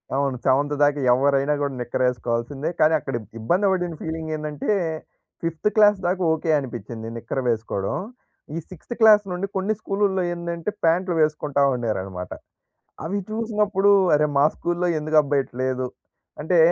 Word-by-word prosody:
అవును 135 -2 0
సెవెంత్ 140 +2 +2
దాక 145 0 +4 0.2
ఎవ్వరైనా 140 +2 +2
గూడా 140 -1 -1
నిక్కర్ 120 +1 -2
ఏసుకోవాల్సిందే. 125 +4 -3
కానీ 155 +1 +5
అక్కడ - - -6
ఇబ్ 110 - -13
ఇబ్బంది 175 - +1
బడిన 180 -3 -1
ఫీలింగ్ 160 0 -4
ఏందంటే 150 +1 -5 0.7
ఫిఫ్త్ 165 +5 0
క్లాస్ 210 -1 +6
దాకా 185 +1 0
ఓకే 160 +1 -3
అనిపించింది 115 -3 -7
నిక్కర్ 115 +3 -3
వేసుకోవడం. 110 -4 -2 0.6
ఈ - - -2
సిక్స్‌త్ 185 +7 -8
క్లాస్ 215 -1 +7
నుండి 180 +2 -2
కొన్ని 195 +3 0
స్కూలుల్లో 195 -2 0
ఏందంటే, 170 +1 -4
ప్యాంట్లు 175 +2 +2
వేసుకుంటా 150 -2 +1
ఉండేరనమాట. 95 -7 -3 0.7
అవి 180 +6 -2
చూసినప్పుడు 210 -3 +1 0.2
అరే 150 +1 +3
మా 140 - +5
స్కూల్లో 175 +1 -1
ఎందుకబ్బా 150 -2 +2
ఇట్ట 135 - -12
లేదు. 130 0 -1 0.6
అంటే 170 +4 +1
155 Hz, 145 wpm, -23 LUFS, 130-185 Hz, 0.7 s, క్లాస్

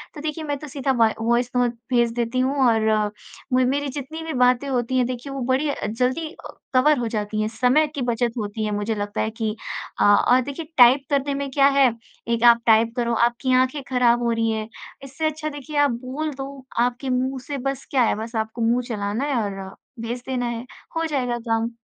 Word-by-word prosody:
तो 295 - -7
देखिए 310 +1 -4
मैं 290 -2 -2
तो 300 - -9
सीधा 275 -1 -1
वा 230 -3 +3
वॉइस 235 +2 +1
नोट 245 -1 +2 0.2
भेज 240 -2 +3
देती 240 +1 -1
हूँ 265 +2 +1
और 220 -2 +2 0.4
मु 255 0 +4
मेरी 285 +2 -1
जितनी 290 +4 -6
भी 320 -1 -4
बातें 250 +1 +3
होती 255 0 0
हैं, 250 - +3
देखिए 255 +3 -5
वो 275 - -4
बड़ी 265 +4 +1
अ, 285 - -3
जल्दी 255 +8 -1
अ, - - -12 0.2
कवर 295 +4 +4
हो 235 - -1
जाती 215 -1 -2
हैं, 215 - 0
समय 250 +7 +2
की 280 - -3
बचत 240 -1 0
होती 215 0 -3
है। 210 - -2
मुझे 205 +2 -1
लगता 205 0 -3
है 220 - 0
कि 220 -2 -3 0.5
अ - - +5 0.2
अ, 250 +1 +6
देखिए 285 +4 -5
टाइप 255 +2 +7
करने 280 -1 +1
में 275 0 -3
क्या 275 0 +5
है, 265 -3 +6 0.4
एक 235 0 0
आप 235 -1 +7
टाइप 225 0 +4
करो, 235 -2 0
आपकी 240 +3 +1
आँखें 260 +3 +2
खराब 240 -2 +3
हो 235 - +1
रही 225 0 +1
हैं, 220 0 -3 0.4
इससे 275 +4 -4
अच्छा 310 0 -5
देखिए 290 +1 -7
आप 290 -2 +4
बोल 300 +4 -3
दो, 270 0 -8
आपके 245 +2 0
मुँह 260 +1 0
से 285 - -3
बस 270 0 -3
क्या 260 -3 +4
है, - - +2
बस 225 +2 -6
आपको 220 +1 -3
मुँह 235 +2 +2
चलाना 210 +1 -2
है 290 -2 -1
और 195 -1 -6 0.2
भेज 235 +2 -4
देना 255 -2 -1
है, 235 0 -4 0.3
हो 330 0 0
जाएगा 255 -6 -1
काम। 225 +1 0
250 Hz, 220 wpm, -23 LUFS, 230-275 Hz, 0.5 s, टाइप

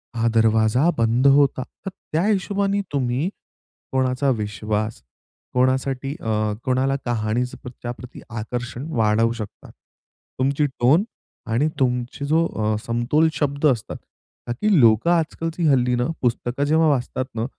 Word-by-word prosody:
हा 115 0 +1
दरवाजा 110 +6 +3
बंद 115 +4 +3
होता, 140 -2 +4 0.2
तर - - -2 0.2
त्या 165 +4 +2
हिशोबाने 200 -1 +1
तुम्ही 130 +4 0 0.6
कोणाचा 130 +1 +1
विश्वास 110 0 -3 0.5
कोणासाठी 130 +1 0
अ, 110 -1 0
कोणाला 130 +1 +1
कहाणीच्या 120 +1 -1
प्रत्या 125 -1 -7
प्रती 125 +1 -11
आकर्षण 120 +4 -5
वाढवू 115 +1 +3
शकतात. 110 -3 -9 0.7
तुमची 140 +3 +2
टोन 140 +7 +3 0.5
आणि 125 +7 +2
तुमची 125 +2 -1
जो 160 +3 +2
अ, 110 0 -1
समतोल 120 +7 +2
शब्द 145 0 -1
असतात, 120 -6 -1 0.5
का, 120 - -1
की 195 - +2
लोकं 115 +8 +5
आजकालची 165 0 0
हल्लीनं 125 0 +2
पुस्तक 120 +1 -1
जेव्हा 155 +2 +3
वाचतात 130 -2 -1
ना, 110 0 -1
125 Hz, 125 wpm, -22 LUFS, 115-145 Hz, 0.7 s, लोकं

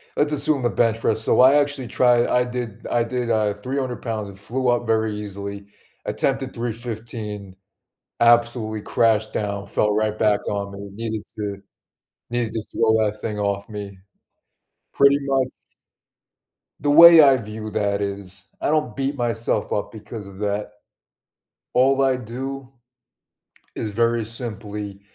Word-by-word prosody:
let's 150 +1 +1
assume 145 -1 +1
the 120 - +2
bench 115 +2 +1
press. 110 -1 0
So, 110 - +3
I 130 +2 +7
actually 145 -3 +1
try 120 0 +3
I 125 - +2
did 120 -3 -6
I 120 - +1
did, 125 0 -3
uh, 110 -2 +2
300 130 +1 -4
pounds, 110 -4 -4
it 95 - -12
flew 125 +6 -2
up 120 0 +1
very 110 -1 +1
easily, 100 -1 -6 0.4
attempted 135 -1 -1
315, 110 -4 -6 0.6
absolutely 115 -2 +3
crashed 110 0 +1
down, 100 -1 -3
fell 105 +1 +1
right 110 0 0
back 105 -2 +1
on 100 -1 -2
me, 100 0 -8
needed 110 0 -4
to 100 -2 -4 0.7
needed 120 -2 -1
to 110 - -2
throw 115 -1 +2
that 105 0 -3
thing 105 -2 -4
off 100 0 -2
me. 100 -3 -7 1.0
Pretty 140 0 +5
much 135 -2 +1 1.3
the 145 - -1
way 165 +2 +10
I 135 -3 +6
view 110 -1 -7
that 100 -1 0
is 100 -1 -6 0.2
I - - 0
don't 150 -7 0
beat 135 +3 -1
myself 115 -4 -1
up 105 - -2
because 110 -1 -9
of 95 -1 -12
that. 105 0 -2 1.0
All 135 +2 +4
I 135 -1 +3
do 130 +3 -6 1.1
is 110 - -3
very 115 +2 +1
simply, 105 -3 -6
115 Hz, 150 wpm, -22 LUFS, 105-125 Hz, 1.3 s, way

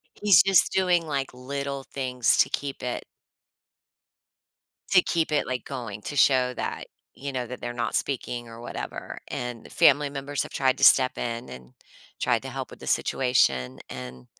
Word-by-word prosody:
He's 205 -2 +6
just 195 -2 +4
doing, 180 -3 +2
like, 140 -3 -2
little 140 +2 -5
things 125 -3 0
to - - +5
keep 140 -1 -4
it 125 -1 -3 1.9
to 180 -2 +6
keep 165 -2 0
it, 150 - +1
like, 125 -2 -3
going 115 -6 -6
to 145 - -6
show 130 -2 +4
that, - - -4 0.3
you 140 0 -6
know, 125 -2 -3
that 125 +2 -8
they're 120 - -4
not 120 -2 -3
speaking 120 -3 -2
or 115 0 -11
whatever, - - -6
and 120 -2 -6
family 145 0 +4
members 140 0 -3
have - - -9
tried 130 -1 +1
to - - +3
step 130 - +6
in 115 0 -4
and 65 0 -11 0.5
tried - - +1
to - - -7
help - - -5
with - - -13
the - - -10
situation, 65 - +1
and 65 -1 -8
130 Hz, 170 wpm, -26 LUFS, 120-140 Hz, 1.9 s, He's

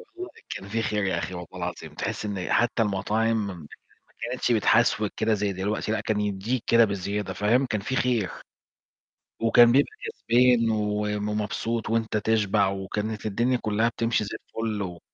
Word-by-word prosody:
والله 365 +1 -6 0.2
كان 100 - -6
في 115 +2 -1
خير 105 -2 -1
يا 95 - 0
أخي 95 - -4
والله 90 -1 -7
العظيم. 85 -3 -5
تحس 100 +6 -4
إن 100 -3 -3
حتى 120 -1 +2
المطاعم 105 +2 0
م - - -4
ما 80 -5 -12 0.5
كانتش 125 -1 0
بتحسوِك 110 -1 +3
كدة 110 0 +2
زي 105 -1 -1
دلوقتي، 105 +3 -2
لأ، 110 - 0
كان 105 0 -1
يدِّيك 105 +4 -2
كدة 115 0 +6
بزيادة، 100 -1 -2
فاهم، 115 +8 +2
كان 105 -4 -2
في 130 +6 -3
خير. 120 -8 +1 1.1
وكان 115 +1 +6
بيبقى 135 +4 +3
كسبان 125 - +3
وم 105 0 -1
مبسوط 115 +2 -2
وأنت 115 -1 0
تشبع، 105 -2 +2
وكانت 105 +3 -3
الدنيا 120 +5 +1
كلها 110 0 +1
بتمشي 115 -1 0
زي 105 - -5
الفل 110 -2 -3
و 90 -2 -6
105 Hz, 165 wpm, -26 LUFS, 100-115 Hz, 1.1 s, كدة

